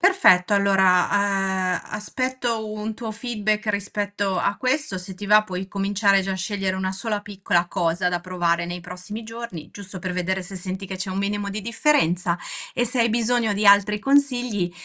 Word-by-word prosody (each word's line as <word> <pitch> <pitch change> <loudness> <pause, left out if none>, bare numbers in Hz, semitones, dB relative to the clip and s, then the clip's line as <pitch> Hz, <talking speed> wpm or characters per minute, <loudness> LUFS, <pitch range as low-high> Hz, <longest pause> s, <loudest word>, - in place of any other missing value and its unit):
Perfetto 345 - +5
allora, 190 -2 +4
uhm, 195 -2 +1
aspetto 235 0 -2
un 215 +1 -4
tuo 225 0 -5
feedback 215 -2 -2
rispetto 200 -1 -1
a 200 - 0
questo. 255 -6 0
Se 185 +1 -6
ti 205 - -8
va 210 +1 +6
puoi 185 -1 -5
cominciare 200 0 +2
già 190 0 -2
a - - -2
scegliere 190 0 -2
una 190 0 -2
sola 205 +1 -2
piccola 190 -4 0
cosa 170 +2 0
da 175 -1 -1
provare 175 -1 0
nei 175 0 -5
prossimi 180 +6 -7
giorni, 225 -8 -8
giusto 195 -2 -7
per 180 0 -4
vedere 185 +1 -1
se 190 +1 -4
senti 185 +2 -4
che 190 - -5
c'è 190 +1 -4
un 185 - -4
minimo 200 0 -1
di 205 +2 -4
differenza 180 - +2 0.4
e 245 - +2
se 245 +1 0
hai 230 - +4
bisogno 230 -1 +1
di 210 +1 -1
altri 200 +1 +6
consigli 245 -7 +1
200 Hz, 180 wpm, -23 LUFS, 185-220 Hz, 0.4 s, va